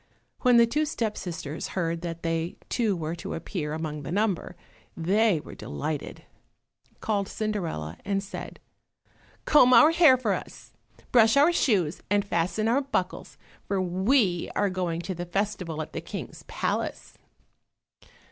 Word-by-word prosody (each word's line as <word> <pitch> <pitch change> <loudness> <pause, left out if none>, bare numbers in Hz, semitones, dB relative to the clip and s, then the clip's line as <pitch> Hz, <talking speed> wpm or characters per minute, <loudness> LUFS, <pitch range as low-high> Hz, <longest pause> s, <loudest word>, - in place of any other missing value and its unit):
When 250 -2 +5
the 235 - +7
two 300 +7 0
step 230 -8 -2
sisters 165 -4 -5
heard 165 -2 -1
that 170 -1 -6
they 165 +1 -1
too 220 -5 +1
were 160 0 -3
to - - -5
appear 165 -2 -4
among 155 -1 -4
the 140 - -6
number, 200 -2 -1 0.4
they 195 +2 +2
were - - -11
delighted, 145 - -5 0.8
called 200 -3 0
Cinderella 175 - -3
and 195 -1 -1
said, 200 - -8 0.9
"Comb 255 -4 +6
our 305 - +8
hair 330 -6 +6
for 225 -5 0
us, 180 - -8 0.4
brush 225 +1 +5
our 305 +5 +5
shoes 185 - +1
and 205 0 +2
fasten 180 +4 0
our 250 +5 +3
buckles, 190 -10 -3 0.3
for 195 -1 0
we 185 +1 +1
are 205 -1 +1
going 175 -3 -2
to 185 +2 -4
the 175 0 -6
festival 180 -4 -2
at - - -13
the - - -4
King's - - -7
palace." - - -3
190 Hz, 145 wpm, -27 LUFS, 165-220 Hz, 0.9 s, our